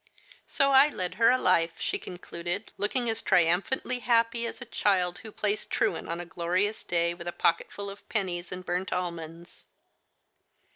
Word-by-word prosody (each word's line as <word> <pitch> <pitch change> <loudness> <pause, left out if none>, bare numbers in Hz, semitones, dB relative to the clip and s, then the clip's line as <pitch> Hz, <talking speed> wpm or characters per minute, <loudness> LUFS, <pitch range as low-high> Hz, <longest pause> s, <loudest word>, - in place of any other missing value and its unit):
So 275 0 +2
I 270 +2 +8
led 185 -11 -4
her 230 - +7
a 255 - +5
life/' 165 -6 +2
she - - -1
concluded, 175 +2 -6
looking 240 +4 -1
as 225 0 -1
tri 175 - +4
umphantly 245 +8 0
happy 235 0 +2
as - - -7
a 240 - -8
child 190 -5 +1
who 220 - -10
plays 210 0 -1
truant - - -1
on 170 +1 -2
a 175 - -5
glorious 180 +5 -1
day 170 0 +1
with 175 0 -9
a - - -1
pocketful 170 +4 0
of 200 0 -10
pennies 180 -5 -1
and 180 0 -6
burnt 180 +2 -2
almonds. 170 -1 -5
185 Hz, 175 wpm, -28 LUFS, 175-225 Hz, -, I